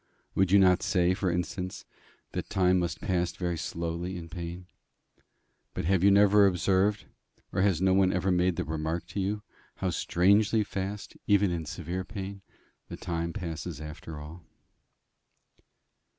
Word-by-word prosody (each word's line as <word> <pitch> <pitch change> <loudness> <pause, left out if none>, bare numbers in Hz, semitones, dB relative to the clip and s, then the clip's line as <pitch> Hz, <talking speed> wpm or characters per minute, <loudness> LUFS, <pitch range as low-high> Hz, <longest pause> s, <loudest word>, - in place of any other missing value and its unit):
Would 95 -1 +2
you 100 - +7
not 90 -2 +5
say, 90 -1 +2
for 95 0 -1
instance, 90 +2 -3 0.5
that - - -4
time 95 -3 +3
must 85 -1 -2
pass 90 -4 0
very 90 -2 -2
slowly 85 +2 -4
in 85 -1 -8
pain? 85 +1 -6 1.1
But - - -2
have 95 0 +2
you 100 - +7
never 100 0 +6
observed, 95 +3 +1 0.5
or 95 - +1
has 95 -3 +2
no 95 -1 +4
one 95 -1 +4
ever 90 +1 +1
made 90 0 +2
the - - -1
remark 80 +2 -2
to - - -4
you, 105 +2 -1 0.3
how 95 -1 -1
strangely 100 +6 +3
fast, 100 0 -5
even 100 -2 +4
in 85 -3 -3
severe 90 +3 -4
pain, 100 0 -7 0.5
the - - -6
time 85 0 -3
passes 80 -5 -5
after 75 0 -8
all? 80 +4 -10
90 Hz, 150 wpm, -29 LUFS, 85-95 Hz, 1.1 s, you